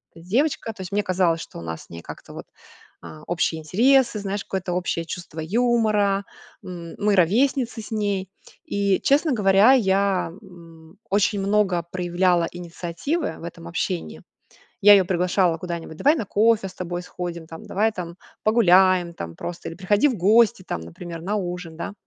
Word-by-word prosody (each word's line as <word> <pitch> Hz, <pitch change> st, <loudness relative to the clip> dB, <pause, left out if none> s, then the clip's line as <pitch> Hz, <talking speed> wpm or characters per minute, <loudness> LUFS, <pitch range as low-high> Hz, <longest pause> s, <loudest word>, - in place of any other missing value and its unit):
эта 165 Hz, 0 st, -14 dB
девочка. 250 Hz, -1 st, 0 dB
То 190 Hz, -, -10 dB
есть, 185 Hz, +1 st, -7 dB
мне 205 Hz, -, +1 dB
казалось, 180 Hz, -4 st, +1 dB
что -, -, -9 dB
у -, -, -8 dB
нас 80 Hz, -1 st, -6 dB
с -, -, -22 dB
ней 85 Hz, 0 st, -9 dB
как-то -, -, -11 dB
вот, -, -, -8 dB, 0.6 s
а, 155 Hz, 0 st, -11 dB
общие 165 Hz, -2 st, -1 dB
интересы, 235 Hz, -, +3 dB
знаешь, 200 Hz, 0 st, -3 dB
какое-то 185 Hz, -2 st, -3 dB
общее 175 Hz, -2 st, -2 dB
чувство 165 Hz, -1 st, -7 dB
юмора. 210 Hz, 0 st, +1 dB, 0.4 s
М, 170 Hz, -2 st, -8 dB
мы 210 Hz, -1 st, +2 dB
ровесницы 230 Hz, -, +2 dB
с -, -, -11 dB
ней. 200 Hz, -3 st, -1 dB, 0.4 s
И, 200 Hz, -2 st, +1 dB
честно 290 Hz, +2 st, +3 dB
говоря, 205 Hz, +3 st, +5 dB
я, 195 Hz, -5 st, +2 dB
м, 165 Hz, -4 st, -15 dB
м, 195 Hz, -, -22 dB
очень 200 Hz, +1 st, +2 dB
много 195 Hz, -3 st, +1 dB
проявляла 175 Hz, -1 st, +1 dB
инициативы 175 Hz, -, -4 dB
в -, -, -12 dB
этом 160 Hz, -, -8 dB
общении. 80 Hz, -2 st, -3 dB, 0.6 s
Я 205 Hz, +1 st, +9 dB
её 195 Hz, -2 st, +6 dB
приглашала 180 Hz, -1 st, +1 dB
куда-нибудь: 170 Hz, -2 st, -6 dB
"Давай 295 Hz, -, +4 dB
на 230 Hz, -, -3 dB
кофе 215 Hz, 0 st, +2 dB
с 185 Hz, -, -16 dB
тобой 175 Hz, -1 st, -4 dB
сходим". 175 Hz, -2 st, -6 dB
Там: 165 Hz, 0 st, -10 dB
"Давай 220 Hz, +3 st, +1 dB
там 175 Hz, -4 st, -7 dB, 0.3 s
погуляем 185 Hz, -5 st, +4 dB
там 85 Hz, -, -7 dB
просто 175 Hz, -, -6 dB
или 165 Hz, -, -9 dB
приходи 200 Hz, -, +2 dB
в 245 Hz, -, -3 dB
гости 215 Hz, +2 st, +4 dB
там, 85 Hz, -, -3 dB
например, 165 Hz, -, -8 dB
на 195 Hz, +5 st, -2 dB
ужин, 180 Hz, -4 st, -4 dB
да". 185 Hz, -, -5 dB
185 Hz, 175 wpm, -23 LUFS, 170-210 Hz, 0.6 s, Я